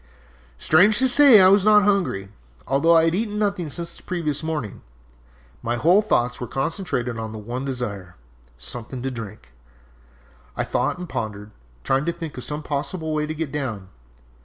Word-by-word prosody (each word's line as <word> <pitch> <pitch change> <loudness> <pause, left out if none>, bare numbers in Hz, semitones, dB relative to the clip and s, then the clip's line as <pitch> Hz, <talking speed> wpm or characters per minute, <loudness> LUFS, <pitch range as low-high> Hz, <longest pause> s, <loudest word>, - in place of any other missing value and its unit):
"Strange 185 - +4
to 260 - +3
say, 260 -3 +7
I 185 0 +7
was 200 0 +5
not 210 0 +6
hungry, 190 - 0 0.4
although 150 +5 +3
I 160 - +5
had 165 - +1
eaten 210 +2 -2
nothing 200 -6 -1
since 170 +3 -5
the - - -14
previous 155 -5 -2
morning. 155 -10 -4 0.8
My 120 +1 -1
whole 175 +11 +4
thoughts 125 - 0
were 125 - -4
concentrated 135 - -3
on 110 -1 -5
the - - -7
one 120 +5 -5
desire 105 -9 -5 0.4
something 120 - -6
to 135 - -2
drink! 105 - -9 1.1
I - - 0
thought - - -1
and 180 0 -7
pondered, 105 -6 -5 0.3
trying 135 +2 +1
to 170 - +1
think 165 -3 -7
of 125 - -6
some 150 +1 -4
possible 155 +3 -3
way 150 0 -1
to 155 - -4
get 155 -3 -4
down! 115 -10 -4
150 Hz, 175 wpm, -23 LUFS, 120-180 Hz, 1.1 s, say